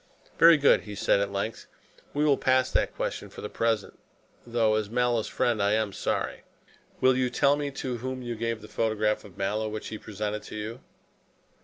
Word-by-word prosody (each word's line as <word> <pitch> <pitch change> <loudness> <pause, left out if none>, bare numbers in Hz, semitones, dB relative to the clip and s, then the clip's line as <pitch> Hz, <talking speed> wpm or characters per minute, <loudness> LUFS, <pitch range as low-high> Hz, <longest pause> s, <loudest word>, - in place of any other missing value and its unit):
"Very 165 -1 +8
good," 140 -1 +5
he 105 -1 -8
said 100 - +2
at 100 0 -1
length, 100 +3 -4 0.4
"we 150 +1 +1
will 145 -2 +5
pass 130 -1 +2
that - - +1
question - - -3
for - - -10
the - - -5
present, 115 -3 -1 0.5
though 115 -2 +2
as 110 -1 0
Mallow's 120 -1 +1
friend 115 -4 0
I 100 +1 +3
am 110 -2 0
sorry. - - -2 0.6
Will 130 0 +5
you 130 -1 +1
tell 140 +3 +3
me 145 -1 -2
to 130 -2 -4
whom 130 +2 -5
you 120 -1 -3
gave 115 -1 -3
the - - -9
photograph 110 -1 0
of 95 -4 -14
Mallow 105 +3 -1
which 110 0 -5
he 110 - -6
presented 105 0 -4
to 105 - -10
you?" 110 +3 -5
110 Hz, 195 wpm, -27 LUFS, 105-125 Hz, 0.6 s, Very